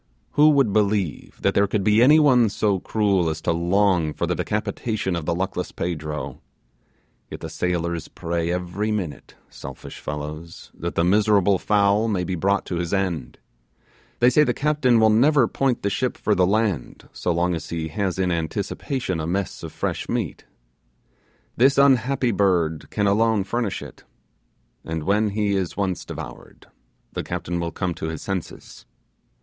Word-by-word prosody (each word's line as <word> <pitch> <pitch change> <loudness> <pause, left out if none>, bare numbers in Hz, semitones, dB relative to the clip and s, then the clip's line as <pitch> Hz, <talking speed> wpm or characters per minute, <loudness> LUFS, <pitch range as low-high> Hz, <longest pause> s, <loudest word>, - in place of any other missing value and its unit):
Who 150 +1 +5
would 140 -9 +3
believe 100 -6 0
that - - +3
there 100 0 +3
could 100 0 -1
be 105 +3 +4
any 150 +5 +7
one 125 -7 +5
so 100 -1 0
cruel 100 -5 +1
as 80 -1 -3
to 85 - 0
long 85 -1 +2
for - - -1
the - - 0
decapitation 105 -2 -2
of 85 -2 -4
the 85 - +1
luckless 95 0 -3
Pedro; 75 -3 -4 0.9
yet - - -8
the - - -6
sailors 85 -2 -2
pray 85 0 -3
every 90 +4 -2
minute, 90 -9 -4
selfish - - -10
fellows, 75 +2 -7
that - - -5
the 85 - +2
miserable 100 0 +3
fowl 105 +1 +2
may 100 -5 0
be 95 - -3
brought 100 +3 +1
to 90 - -3
his 85 +2 -1
end. 85 -10 -2 0.8
They 120 +1 +4
say 150 +4 +5
the - - 0
captain 140 -5 +2
will 110 0 +5
never 130 +3 +4
point 135 0 -1
the 100 - +1
ship 125 +4 -1
for 105 - +1
the 90 -2 +3
land 100 - -1
so 90 - -1
long 85 +1 +1
as 80 -1 -5
he 80 -1 -3
has 95 +2 -2
in 95 -1 +1
anticipation 85 - -2
a 80 - -3
mess 95 +1 -2
of - - -7
fresh - - -3
meat. - - -3 1.1
This 135 +3 +4
unhappy 135 -2 +3
bird 90 -6 +1
can 105 - -1
alone 110 +1 +3
furnish 115 0 -2
it; - - -12 0.8
and 80 -1 -4
when 105 +4 +2
he 105 0 0
is 95 -3 -1
once 95 -3 -2
devoured, - - -9 0.5
the - - -2
captain 85 0 -3
will 85 -1 -2
come 90 +1 -2
to 80 - -5
his 80 -1 -5
senses. 95 -4 -6
95 Hz, 170 wpm, -23 LUFS, 85-110 Hz, 1.1 s, any